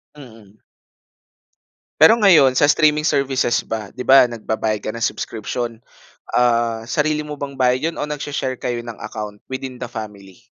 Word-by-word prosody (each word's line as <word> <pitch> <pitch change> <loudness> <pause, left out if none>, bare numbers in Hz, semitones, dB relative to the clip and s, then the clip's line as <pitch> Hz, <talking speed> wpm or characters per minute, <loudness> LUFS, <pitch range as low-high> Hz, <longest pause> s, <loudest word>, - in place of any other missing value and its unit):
Mm. 110 -7 -15 1.4
Pero 160 +9 +8
ngayon 160 - +5
sa - - +5
streaming 150 0 +3
services 135 -5 +1
ba? 110 -3 -5
'Di 125 - -7
ba, 135 +1 +6
nagbabayad 110 -2 -3
ka 110 - -4
ng 115 0 -5
subscription. 115 +1 -3 0.6
Ah, 115 -2 +1
sarili 150 +4 -1
mo 150 -1 -8
bang 140 -1 -6
bayad 130 +4 +1
'yon - - -14
o - - -1
nagsha-share 145 -3 -4
kayo 120 -1 -2
ng 115 -2 -8
account 105 -1 -7
within 130 -1 -6
the - - -5
family? 105 -5 -10
125 Hz, 155 wpm, -20 LUFS, 115-145 Hz, 1.4 s, Pero